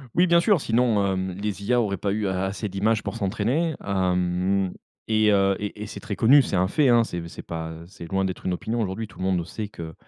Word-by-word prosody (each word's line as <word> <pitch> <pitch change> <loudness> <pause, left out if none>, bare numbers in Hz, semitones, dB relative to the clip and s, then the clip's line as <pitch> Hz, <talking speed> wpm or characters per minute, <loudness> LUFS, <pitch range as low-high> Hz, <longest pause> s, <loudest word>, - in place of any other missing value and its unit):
Oui 180 - +5
bien 170 -1 +5
sûr 185 0 +3
sinon, 115 -4 +2
hem, 95 -1 -1
les 100 +1 -4
IA 120 +4 +2
auraient 100 -4 -1
pas 100 +3 -1
eu 105 0 -1
a 95 0 -1
assez 100 +3 -3
d'images 105 +3 0
pour - - -4
s'entraîner 120 - 0
hem, 90 0 0 0.3
et 110 -1 +3
heu 100 -1 +3
et 105 0 -5
et - - -5
c'est - - -8
très 110 -4 -5
connu, 135 +8 +6
c'est 110 - -2
un 90 +1 +2
fait, 140 +7 +2
hein, 120 -1 +5
c'est 85 -6 -5
c'est - - -10
pas, 80 -1 -5
heu, 80 +1 -10
c'est 85 -1 -11
loin 95 0 +1
d'être 95 -1 -5
une 90 - +1
opinion 115 +6 -2
aujourd'hui, 105 +2 -3
tout 95 - -17
le 95 - -2
monde 90 -3 0
sait 105 +5 -5
que, 85 -5 -8
100 Hz, 250 wpm, -24 LUFS, 95-110 Hz, 0.3 s, connu